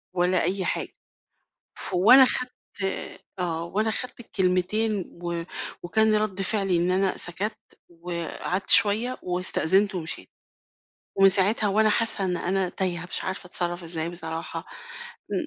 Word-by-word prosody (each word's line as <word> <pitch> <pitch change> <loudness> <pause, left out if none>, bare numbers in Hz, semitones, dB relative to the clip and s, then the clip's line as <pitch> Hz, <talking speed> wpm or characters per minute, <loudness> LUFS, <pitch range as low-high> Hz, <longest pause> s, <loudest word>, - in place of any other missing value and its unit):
ولا 180 0 +1
أي 185 +2 -1
حاجة، - - -3 0.9
ف - - -5
وأنا 245 +9 +7
خدت 250 0 0 0.3
آآ 195 0 -4 0.2
آه 170 -2 -2
وأنا 210 +6 -1
خدت 250 +3 -4
الكلمتين 195 0 -1 0.2
و 170 -1 -3 0.4
وكان 220 +5 +2
رد 210 -3 -1
فعلي 195 -3 +2
إن 175 +1 0
أنا 190 +1 +1
سكت 200 +5 -2 0.3
وقعدت 175 +2 -5
شوية 225 +5 +5
واستأذنت 185 +2 +1
ومشيت، 170 -3 -4 0.9
ومن 195 0 +7
ساعتها 200 +3 +5
وأنا 215 +2 +2
حاسة 220 -3 +2
إن 180 -1 -1
أنا 185 +1 -1
تايهة، 180 -1 -3
مش - - -3
عارفة 190 0 -5
أتصرف 175 0 0
إزاي 165 0 -3
بصراحة 165 -1 -6 0.6
م - - -6
185 Hz, 135 wpm, -24 LUFS, 175-210 Hz, 0.9 s, وأنا